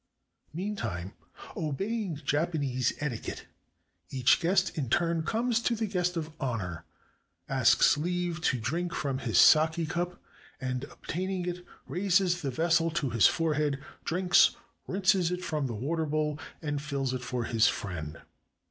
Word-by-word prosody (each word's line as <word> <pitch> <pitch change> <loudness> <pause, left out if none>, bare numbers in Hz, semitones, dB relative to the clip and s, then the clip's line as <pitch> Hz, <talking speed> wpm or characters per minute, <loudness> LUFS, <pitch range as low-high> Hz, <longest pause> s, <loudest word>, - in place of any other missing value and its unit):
Meantime, 120 - -4 0.4
obeying 190 +5 -2
Japanese 145 -4 0
etiquette, 135 -7 -4 0.6
each 130 -1 +3
guest 185 +2 +1
in 140 -7 -2
turn 170 +4 +1
comes 230 +6 0
to 235 0 0
the 220 0 -1
"guest 180 -3 -1
of 160 -1 -3
honor," 90 - -3 0.6
asks - - +4
leave 175 +1 -2
to 130 - +2
drink 170 +10 -2
from 135 -3 -2
his 115 -4 0
sake 160 +1 +5
cup, 175 +2 -2 0.4
and 130 0 -3
obtaining 185 +4 -4
it, 180 0 -4 0.2
raises 180 -1 +1
the 140 - -2
vessel 165 +4 +2
to 155 -6 -1
his 115 -4 +6
forehead, 150 -3 0 0.3
drinks, 180 +1 +4 0.3
rinses 190 -2 +2
it 180 0 -3
from 150 -5 -1
the 115 - -4
water 155 +8 -1
bowl, 150 0 -1 0.2
and 145 -2 -2
fills 140 -3 -2
it 130 - -3
for 125 -1 -3
his 115 -1 +3
friend. 80 -5 -4
160 Hz, 140 wpm, -29 LUFS, 130-180 Hz, 0.6 s, his